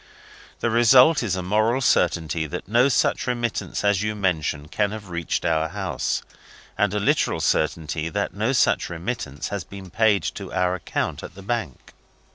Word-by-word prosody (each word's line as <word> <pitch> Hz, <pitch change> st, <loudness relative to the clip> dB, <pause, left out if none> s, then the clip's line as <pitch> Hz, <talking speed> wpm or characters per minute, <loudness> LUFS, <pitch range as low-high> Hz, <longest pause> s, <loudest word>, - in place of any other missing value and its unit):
The 120 Hz, -, +1 dB
result 125 Hz, +7 st, +6 dB
is 105 Hz, -7 st, -1 dB
a 95 Hz, -, -3 dB
moral 110 Hz, +6 st, +2 dB
certainty 80 Hz, -, +1 dB
that 90 Hz, +3 st, -6 dB
no 120 Hz, +6 st, +4 dB
such 130 Hz, -, +1 dB
remittance 120 Hz, -4 st, -2 dB
as 100 Hz, -1 st, +2 dB
you 105 Hz, 0 st, -2 dB
mention 80 Hz, -7 st, -1 dB
can 105 Hz, +6 st, 0 dB
have 105 Hz, -3 st, -8 dB
reached 85 Hz, -1 st, -2 dB
our 80 Hz, -1 st, +1 dB
house, -, -, -2 dB, 0.5 s
and 105 Hz, -2 st, +1 dB
a -, -, +1 dB
literal 100 Hz, -, +1 dB
certainty 80 Hz, +1 st, 0 dB
that 100 Hz, 0 st, -2 dB
no 110 Hz, +6 st, 0 dB
such 135 Hz, -, +2 dB
remittance 85 Hz, -, -4 dB
has 100 Hz, -3 st, -3 dB
been 95 Hz, -1 st, -11 dB
paid 110 Hz, -3 st, +3 dB
to 100 Hz, -2 st, -5 dB
our 90 Hz, -1 st, +1 dB
account 90 Hz, -, -3 dB
at 90 Hz, -, -10 dB
the 100 Hz, -, -11 dB
bank. 100 Hz, -, -4 dB
100 Hz, 170 wpm, -23 LUFS, 85-110 Hz, 0.5 s, result